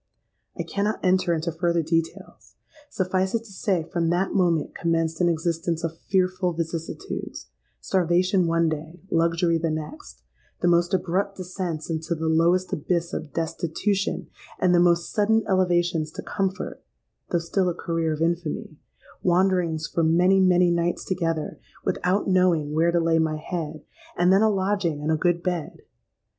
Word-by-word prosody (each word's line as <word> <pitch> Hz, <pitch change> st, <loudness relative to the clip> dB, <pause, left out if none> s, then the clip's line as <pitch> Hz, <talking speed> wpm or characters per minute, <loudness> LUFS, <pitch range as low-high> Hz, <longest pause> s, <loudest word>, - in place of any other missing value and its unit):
I -, -, -2 dB
cannot 205 Hz, +2 st, -1 dB
enter 185 Hz, -1 st, +2 dB
into 165 Hz, 0 st, -1 dB
further 170 Hz, 0 st, 0 dB
details; 165 Hz, +1 st, -3 dB, 0.3 s
suffice 185 Hz, -1 st, 0 dB
it 230 Hz, -, -1 dB
to 225 Hz, -, -14 dB
say, 190 Hz, -3 st, 0 dB
from 170 Hz, 0 st, -1 dB
that 180 Hz, +3 st, 0 dB
moment 170 Hz, -5 st, +1 dB
commenced 165 Hz, 0 st, -1 dB
an 175 Hz, -, +4 dB
existence 165 Hz, 0 st, -1 dB
of 165 Hz, -1 st, -2 dB
fearful 185 Hz, -1 st, 0 dB
vicissitudes,—starvation 175 Hz, -, -2 dB
one 165 Hz, 0 st, +2 dB
day, 160 Hz, +2 st, -4 dB
luxury 165 Hz, 0 st, +2 dB
the 165 Hz, 0 st, -1 dB
next,—the 65 Hz, -, -7 dB
most 175 Hz, +1 st, +3 dB
abrupt 190 Hz, +2 st, -1 dB
descents 180 Hz, -4 st, -4 dB
into 160 Hz, +1 st, -2 dB
the 160 Hz, 0 st, -4 dB
lowest 170 Hz, +3 st, +2 dB
abyss 170 Hz, +3 st, -1 dB
of 155 Hz, -2 st, -5 dB
destitution, 170 Hz, +5 st, -1 dB, 0.3 s
and 180 Hz, -1 st, +3 dB
the 175 Hz, -, +5 dB
most 170 Hz, -1 st, +3 dB
sudden 220 Hz, +1 st, +3 dB
elevations 175 Hz, -4 st, +1 dB
to -, -, -7 dB
comfort, 195 Hz, -1 st, -3 dB, 0.5 s
though 175 Hz, -, +2 dB
still 180 Hz, +2 st, 0 dB
a 170 Hz, -, -3 dB
career 165 Hz, -1 st, -1 dB
of 155 Hz, +1 st, -1 dB
infamy,—wanderings 170 Hz, +1 st, -1 dB
for 165 Hz, -, -1 dB
many, 180 Hz, +4 st, +4 dB
many 180 Hz, -1 st, +4 dB
nights 170 Hz, 0 st, 0 dB
together, 165 Hz, -4 st, -2 dB, 0.3 s
without 185 Hz, +3 st, 0 dB
knowing 180 Hz, -6 st, +2 dB
where 165 Hz, +2 st, +3 dB
to 170 Hz, -, +2 dB
lay 165 Hz, -1 st, +2 dB
my 160 Hz, -1 st, 0 dB
head, 155 Hz, -1 st, -5 dB, 0.3 s
and 180 Hz, +2 st, +4 dB
then 195 Hz, -, +5 dB
a 220 Hz, -, +5 dB
lodging 190 Hz, -5 st, 0 dB
and 155 Hz, -, 0 dB
a -, -, +3 dB
good 175 Hz, +1 st, +1 dB
bed! 175 Hz, -4 st, -3 dB
170 Hz, 150 wpm, -25 LUFS, 165-185 Hz, 0.5 s, the